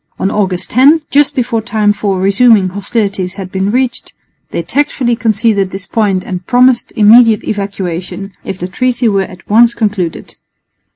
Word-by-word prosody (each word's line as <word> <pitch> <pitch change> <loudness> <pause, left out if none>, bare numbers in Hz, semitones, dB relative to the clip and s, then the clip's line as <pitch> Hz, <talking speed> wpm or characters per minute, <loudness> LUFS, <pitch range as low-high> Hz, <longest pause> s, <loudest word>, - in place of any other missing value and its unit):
On 195 - -1
August 190 -4 -2
10, 285 +7 +4
just 290 0 +2
before 235 -3 -1
time 215 -2 0
for 200 -2 -2
resuming 200 +1 +3
hostilities 195 -1 -3
had 190 -2 -8
been 190 +1 -1
reached, 255 +2 -2 0.4
they - - -4
tactfully 275 -4 -1
conceded 215 -4 0
this 195 0 -6
point 200 -5 -1
and 185 -1 -6
promised 250 0 +2
immediate 220 0 +5
evacuation, 195 -1 -5
if 190 - -6
the 180 - -5
treaty 245 +4 -1
were 200 -3 +1
at 180 -2 -14
once 235 +2 +4
concluded. 200 -7 -3
210 Hz, 155 wpm, -12 LUFS, 195-235 Hz, 0.4 s, immediate